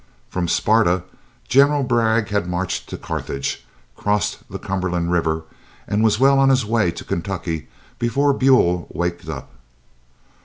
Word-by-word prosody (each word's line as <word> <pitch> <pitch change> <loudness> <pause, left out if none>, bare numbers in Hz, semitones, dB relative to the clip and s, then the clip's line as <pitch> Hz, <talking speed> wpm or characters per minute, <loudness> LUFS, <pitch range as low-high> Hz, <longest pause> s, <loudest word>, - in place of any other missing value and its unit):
From 90 -2 -1
Sparta 95 -3 +2 0.4
General 140 +2 +4
Bragg 115 -4 +1
had 100 -4 -1
marched 90 +1 -3
to - - -5
Carthage, 70 0 -4 0.3
crossed 105 -1 0
the - - -5
Cumberland 90 -3 -2
River, 80 -2 0 0.4
and 105 +2 +1
was 110 -1 +3
well 135 +1 +5
on 135 0 +5
his 130 -4 +3
way 110 -4 +2
to 85 - -6
Kentucky 85 -3 -3 0.3
before 140 +4 +2
Buell 125 -11 +3
waked 85 0 -3
up. - - -6
105 Hz, 140 wpm, -21 LUFS, 85-120 Hz, 0.4 s, well